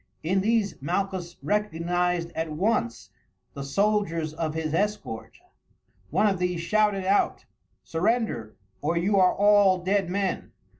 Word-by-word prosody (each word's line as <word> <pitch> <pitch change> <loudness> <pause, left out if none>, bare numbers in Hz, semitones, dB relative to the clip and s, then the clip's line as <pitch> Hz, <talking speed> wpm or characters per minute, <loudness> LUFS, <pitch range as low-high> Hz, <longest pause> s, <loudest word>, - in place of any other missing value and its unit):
In 190 +4 +1
these 215 - 0
Malchus 180 +2 -2
recognized 175 -3 0
at 160 -1 -3
once 155 - -1 0.4
the 140 - -6
soldiers 165 -1 0
of 155 -1 -3
his 160 -1 -2
escort. 200 - -2 0.7
One - - +2
of 195 -3 +2
these 180 -1 -1
shouted 205 +1 +1
out: 195 +2 +1 0.4
"Surrender, 180 - -1 0.3
or 165 +4 0
you 195 +4 +2
are 185 -1 +4
all 205 -2 +5
dead 190 +1 0
men. 195 0 -2
185 Hz, 130 wpm, -26 LUFS, 165-205 Hz, 0.7 s, all